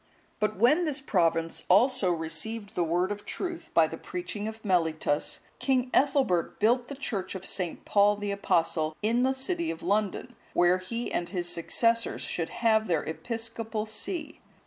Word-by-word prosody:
But 215 -2 0
when 255 - +4
this 300 -2 -1
province 165 - +1
also 200 0 +4
received 175 +7 -3
the 180 - +1
word 175 +4 +1
of 205 0 -5
truth, 350 -3 -5
by 165 - +7
the 165 +1 -6
preaching 180 +4 -5
of 220 0 -8
Mellitus, 160 -5 +1 0.2
King 255 -2 +1
Ethelbert 265 - +2
built 240 +3 +3
the 280 - -6
church 200 -9 -4
of 190 0 -6
St. 180 -4 -3
Paul 205 0 +4
the 205 0 -3
Apostle,(175) 165 -5 +1
in 230 +3 +2
the 265 +1 +2
city 335 +5 -2
of 165 - -5
London, 205 -1 -1 0.2
where 175 +1 +4
he 230 +6 -4
and 175 - -1
his 175 -3 -2
successors 230 +7 +1
should 165 -2 -2 0.2
have 220 -1 +4
their 165 -4 +1
episcopal 225 +2 -4
see. 220 - -5
205 Hz, 165 wpm, -28 LUFS, 175-235 Hz, 0.2 s, by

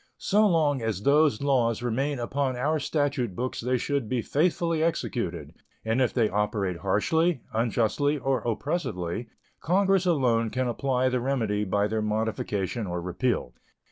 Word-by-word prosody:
So 210 +2 +3
long 150 -7 +2
as 110 -3 -2
those 145 -3 +3
laws 120 -4 +1
remain 135 +4 -1
upon 130 +2 -1
our 150 +5 0
statute 140 - -1
books 125 +4 -3
they 125 +2 +1
should 140 -3 -2
be 125 -3 -1
faithfully 165 +1 +1
executed, 90 - -2 0.3
and 110 +4 +1
if 125 - +2
they 115 -4 +2
operate 100 -3 -1
harshly, 130 - +1
unjustly, 115 +6 +1
or 135 -2 0
oppressively 115 - -3 0.3
Congress 190 +1 +2
alone 120 -9 +2
can 130 +2 -1
apply 130 +1 0
the 125 0 0
remedy 115 -5 0
by 100 +2 +1
their 110 +1 -1
modification 105 -1 -2
or 90 0 -3
repeal. 90 - -2
125 Hz, 145 wpm, -27 LUFS, 105-145 Hz, 0.3 s, So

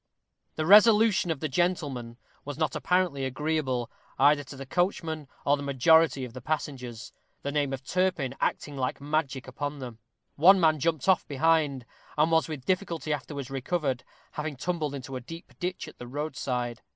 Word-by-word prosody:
This 155 - -1
resolution 210 0 +6
of 160 -4 -2
the 155 - 0
gentleman 140 -7 -1 0.3
was 145 -1 -6
not 155 -1 0
apparently 180 -7 +1
agreeable, 135 -3 -1 0.3
either 145 +1 +4
to 140 - -10
the 135 0 -7
coachman 160 -1 -1 0.2
or 145 - +4
the 145 - -7
majority 140 +1 +4
of 120 - -10
the 130 - -8
passengers 125 -5 -4 0.3
the 140 - -2
name 145 -2 0
of 135 0 -5
Turpin 180 -6 0
acting 145 - -1
like 130 -2 -2
magic 140 -3 -2
upon 145 +3 -4
them. 120 -4 -8 0.4
One 185 +6 +7
man 155 -3 +3
jumped 160 +1 0
off 190 -2 +3
behind, 145 -3 +1 0.3
and 155 +2 +3
was 160 0 +3
with 150 -5 -6
difficulty 175 -5 -1
afterwards 140 -1 -5
recovered, 135 -1 -1 0.3
having 150 -1 -4
tumbled 155 0 -2
into 135 -1 -7
a - - -7
deep 165 +8 -10
ditch 180 0 -3
at - - -13
the 125 - -8
roadside. 125 -4 -3
145 Hz, 170 wpm, -28 LUFS, 130-165 Hz, 0.4 s, One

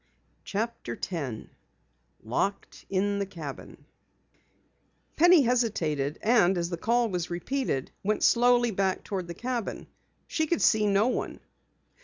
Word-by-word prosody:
CHAPTER 215 - -3
10 140 - -5 0.7
LOCKED 195 - -3
IN 200 +1 0
THE 200 - -2
CABIN 155 -7 -9 1.3
Penny 345 -2 +6
hesitated, 165 - 0
and 210 -5 +4
as 170 +1 -2
the 170 - -2
call 235 +5 +2
was 180 -3 -3
repeated, 175 - -2
went 210 +2 0
slowly 240 0 +4
back 190 -1 0
toward 185 -3 -4
the 170 - -7
cabin. 245 -2 -4 0.4
She 315 -1 -1
could 340 - 0
see 215 -1 +4
no 200 +1 +3
one. 255 - -2
200 Hz, 125 wpm, -28 LUFS, 175-240 Hz, 1.3 s, Penny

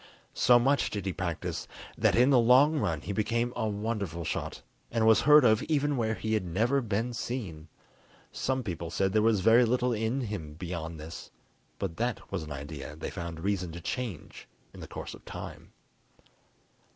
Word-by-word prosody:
So 120 - +5
much 135 +4 +2
did 100 -3 -4
he 95 - -1
practice 85 -3 -4 0.3
that - - +2
in 125 +3 +5
the 130 - +6
long 135 +6 +5
run 80 - -1
he 100 - -4
became 115 +4 0
a 110 -2 -1
wonderful 100 -6 -3
shot, - - -4 0.3
and 115 -1 +1
was 110 -1 +6
heard 150 -2 +7
of 110 -2 +4
even 145 -1 +1
where 110 -3 0
he 110 0 -2
had 110 -3 +1
never 115 +11 +1
been 115 +2 -2
seen. 105 -10 -5 0.6
Some 130 -1 -1
people 85 -5 -4
said 95 +3 0
there 110 - +4
was 110 -3 +3
very 115 +4 +6
little 125 +1 +1
in 115 +4 -1
him 85 -10 -5
beyond 85 -2 -5
this, 80 +2 -8 0.5
but 80 - -4
that 120 0 -3
was - - -2
an 75 -1 -8
idea 75 0 -7
they 80 - -5
found 85 -3 -6
reason 95 -2 -1
to 85 - -6
change 110 - -5 0.3
in - - -12
the - - -8
course - - -7
of - - -13
time. - - -9
110 Hz, 185 wpm, -29 LUFS, 85-120 Hz, 0.6 s, heard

